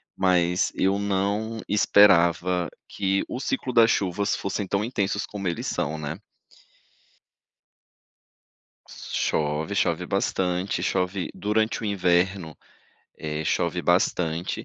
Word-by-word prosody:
mas 90 -1 +2
eu 95 +1 +1
não 100 +3 -1
esperava 90 -4 +4 0.2
que 95 0 0
o 125 - -5
ciclo 140 - -2
das 115 -1 +6
chuvas 100 +1 0
fossem 100 0 -3
tão 100 +2 0
intensos 100 -4 -1
como 100 -2 -5
eles 85 - -3
são, 75 +2 -2
né. 75 0 -5 2.7
Chove, 75 +1 -2
chove - - 0
bastante, 90 +1 -1
chove 90 0 -1
durante 110 +2 0
o - - -3
inverno, 90 -4 0 0.6
eh, 75 0 -4
chove - - 0
bastante 85 0 0
95 Hz, 105 wpm, -25 LUFS, 85-100 Hz, 2.7 s, das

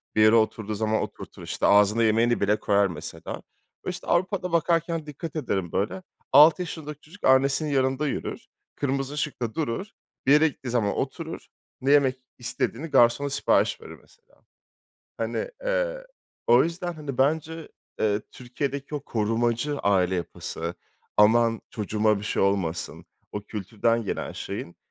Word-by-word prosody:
bir 110 - +4
yere 110 +1 +7
oturduğu 110 -1 +1
zaman 110 +1 0
oturtur - - -8
işte, - - -2
ağzına 105 +3 +5
yemeğini 115 +2 +3
bile 105 +2 +2
koyar 100 -1 +3
mesela. 80 -1 -7 0.5
İşte - - -5
Avrupa'da 180 0 0
bakarken 165 -1 +1
dikkat 150 +2 -7
ederim 95 - -2
böyle, 110 - -2 0.3
6 155 +6 +7
yaşındaki 150 -4 -6
çocuk 180 +7 -16
annesinin 135 +3 +4
yanında 135 +1 +1
yürür, - - -4 0.3
kırmızı 135 0 -2
ışıkta 135 -6 -3
durur, 160 - -2 0.4
bir 135 - +4
yere 150 +2 +6
gittiği 130 -3 -6
zaman 110 -4 +1
oturur, 160 +4 -4 0.3
ne 135 +2 +2
yemek 135 -3 +5 0.2
istediğini 125 +4 -3
garsona 120 +1 +4
sipariş 140 - +1
verir - - -10
mesela. 480 0 -27 0.8
Hani, - - -3
eee, - - -1 0.4
o 120 +2 +6
yüzden, 175 +2 -3
hani, 145 -5 -7
bence, 160 +3 0 0.3
eee, 105 -1 +2
Türkiye'deki 140 +3 -4
o 145 - -2
korumacı 120 +4 0
aile 95 -2 +2
yapısı, 85 -1 -4 0.4
aman 115 +2 +4
çocuğuma 105 0 +1
bir 105 - -7
şey - - 0
olmasın, 95 -4 -1 0.3
o 105 - -3
kültürden 110 +3 -1
gelen - - -3
şeyin 85 - -6
130 Hz, 140 wpm, -26 LUFS, 110-155 Hz, 0.8 s, yere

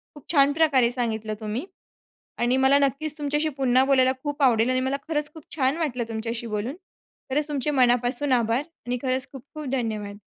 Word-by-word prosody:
खूप 295 0 -7
छान 280 -1 +5
प्रकारे 280 -6 +3
सांगितलं 220 -3 -2
तुम्ही. 220 +7 -4 0.7
आणि 240 +2 +2
मला 265 +1 +5
नक्कीच 285 +2 0
तुमच्याशी 295 +1 0
पुन्हा 255 0 +4
बोलायला 260 -1 +4
खूप 290 0 -4
आवडेल. 235 -2 +4
आणि 255 0 +2
मला 265 +2 0
खरंच 300 -2 -1
खूप 315 - -12
छान 270 0 +1
वाटलं 270 -8 -1
तुमच्याशी 230 +1 -4
बोलून. 215 +5 -3 0.5
खरंच 290 +3 0
तुमचे 295 -1 -1
मनापासून 250 +1 +2
आभार. 235 +2 +2 0.2
आणि 250 0 -1
खरंच 260 0 -1
खूप 270 -3 -10
खूप 305 -1 -6
धन्यवाद. 215 -5 -3
260 Hz, 175 wpm, -25 LUFS, 240-290 Hz, 0.7 s, छान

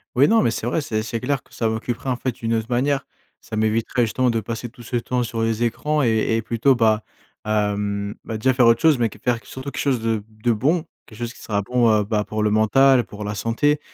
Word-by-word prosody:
Ouais, 140 +4 +5
non, 225 +3 +4
mais 115 - +2
c'est 115 - -4
vrai, 150 +6 0
c'est 110 -6 -2
c'est 115 0 -4
clair 140 0 -1
que - - -25
ça 115 - 0
m'occuperait 115 +3 -3
en 125 - 0
fait 125 -1 -2
d'une 115 0 -2
autre 110 -1 -1
manière. 135 +3 0 0.3
Ça 110 - -8
m'éviterait 110 +3 0
justement 125 +2 +1
de 115 -1 0
passer 115 +3 -5
tout 120 0 -14
ce 120 - -2
temps 125 +1 -1
sur 115 -1 -3
les 115 +1 0
écrans 150 +5 0
et 110 -1 +2
et 115 - 0
plutôt 120 +4 +2
bah, 110 -2 +2 0.4
hem, 105 -1 -1
bah 110 - -4
déjà 130 +4 +2
faire 125 -1 +4
autre 115 +5 +4
chose, 160 -4 +5
mais 115 - +3
que 105 - -11
faire 125 -2 +2
surtout 130 +2 -7
quelque - - -6
chose 130 -5 +1
de 115 -2 0 0.2
de 120 - +3
bon, 150 +10 +1 0.2
quelque 110 - -15
chose 120 0 -4
qui - - -17
sera 100 -2 -1
bon, 120 +2 +2
heu, 105 -1 +3
bah 105 0 -1
pour 110 0 -2
le 105 - +3
mental, 125 +4 +4
pour 105 0 -8
la 105 0 -3
santé. 120 +9 +1
115 Hz, 255 wpm, -22 LUFS, 110-125 Hz, 0.4 s, Ouais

